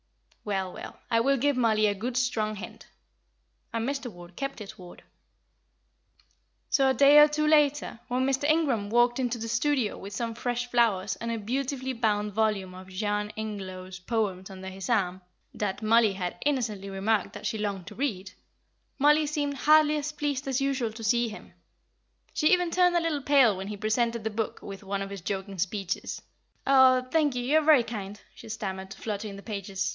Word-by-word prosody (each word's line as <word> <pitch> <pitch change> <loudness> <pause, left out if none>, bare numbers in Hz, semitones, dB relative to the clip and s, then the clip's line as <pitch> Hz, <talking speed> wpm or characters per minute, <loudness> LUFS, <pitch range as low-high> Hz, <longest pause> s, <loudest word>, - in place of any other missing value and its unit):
Well, 190 -3 -2
well, - - -9
I 230 - +4
will 275 +4 +3
give 285 +2 +1
Mollie 220 -3 +3
a 205 - +3
good 240 +5 -4
strong 220 -4 0
hint." 205 - -10 0.8
And 230 +1 -2
Mr. 275 -3 -3
Ward 175 -1 -13
kept 275 0 -4
his 210 -3 -9
word. 180 -1 -13 1.7
So 270 -2 +4
a 265 - +1
day 285 +1 +7
or 295 - +9
two 305 0 -1
later, 295 -5 +2
when 255 +1 0
Mr. 270 +1 0
Ingram 285 -10 +2
walked 240 +2 +3
into 245 -2 -1
the 230 0 -5
studio 240 0 0
with 200 +1 -8
some 230 +2 -3
fresh 245 +1 -2
flowers 220 -6 +1
and 230 - -5
a 230 - -1
beautifully 260 +4 -2
bound 210 -3 0
volume 210 -3 0
of 185 +1 -11
Jean 210 +2 -2
Ingelow's 190 -4 -6
poems 190 -2 -2
under 190 0 -8
his 190 +4 -7
arm, 190 -5 +1 0.3
that 205 +1 -3
Mollie 220 -1 +4
had 180 -2 -4
innocently 220 -9 -1
remarked 195 +1 0
that - - -9
she 220 - -2
longed 200 -4 -3
to 210 +2 -10
read, 200 -8 -3 0.7
Mollie 300 +2 +4
seemed 290 -1 -1
hardly 305 +2 +4
as 300 +1 -3
pleased 290 -2 -3
as 265 0 0
usual 270 -4 0
to 225 0 -9
see 235 +2 +2
him; 215 - -11 0.8
she 305 - +2
even 355 -2 +3
turned 360 0 +3
a - - +5
little 320 -3 -1
pale 270 -6 +5
when 190 +1 -6
he 210 0 -5
presented 230 +2 0
the 220 - -2
book 220 +1 -3
with 195 0 -8
one 195 0 -2
of 195 - -8
his 200 -2 -6
joking 195 +1 -4
speeches. 195 +1 -2 0.5
"Oh, 260 -2 +6
thank 300 -5 +2
you; 245 - -2
you 295 +5 +4
are - - -1
very 300 -5 +5
kind," 210 -3 -6
she - - -12
stammered, 190 -2 -5
fluttering 210 -1 -5
the 200 - -11
pages. 195 -3 -3
225 Hz, 190 wpm, -27 LUFS, 200-270 Hz, 1.7 s, or